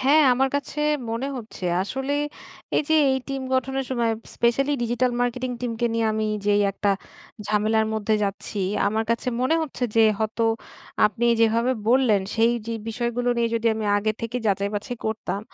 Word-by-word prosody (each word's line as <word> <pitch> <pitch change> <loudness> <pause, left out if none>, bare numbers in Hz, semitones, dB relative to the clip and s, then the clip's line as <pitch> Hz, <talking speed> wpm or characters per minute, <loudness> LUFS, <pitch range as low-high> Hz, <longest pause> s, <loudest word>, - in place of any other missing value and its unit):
হ্যাঁ, 290 +3 +5
আমার 265 +1 +2
কাছে 285 +1 -4 0.3
মনে 230 +4 -2
হচ্ছে, 220 -5 -8 0.2
আসলে 265 +7 -3 0.6
এই - - +3
যে 315 - +4 0.2
এই 265 - +1
টিম 275 -1 -3
গঠনের 265 +1 0
সময় 235 -3 +1 0.2
স্পেশালি 275 +5 +2
ডিজিটাল 240 +2 +1
মার্কেটিং 245 +1 -1
টিমকে 235 -1 -1
নিয়ে 230 -1 +1
আমি 215 0 -1 0.2
যেই 205 0 +4
একটা 200 +1 0 0.6
ঝামেলার 215 +1 +2
মধ্যে 215 0 +1
যাচ্ছি। 200 +1 -4 0.3
আমার 220 +2 0
কাছে 235 +2 0
মনে 255 +6 +2
হচ্ছে 265 -4 -3
যে 225 - +7 0.2
হয়তো 220 +1 0 0.6
আপনি 230 +3 -1
যেভাবে 230 +3 +3 0.2
বললেন 235 -5 +4
সেই 230 +1 +4
যে 230 - -2
বিষয়গুলো 240 +2 -1
নিয়ে 235 -1 +2
যদি 230 0 0
আমি 220 -1 -3
আগে 215 +1 +1
থেকে 230 +2 -3
যাচাই-বাছাই 205 +4 -1
করতাম। 220 -2 -3
230 Hz, 160 wpm, -24 LUFS, 220-255 Hz, 0.6 s, যে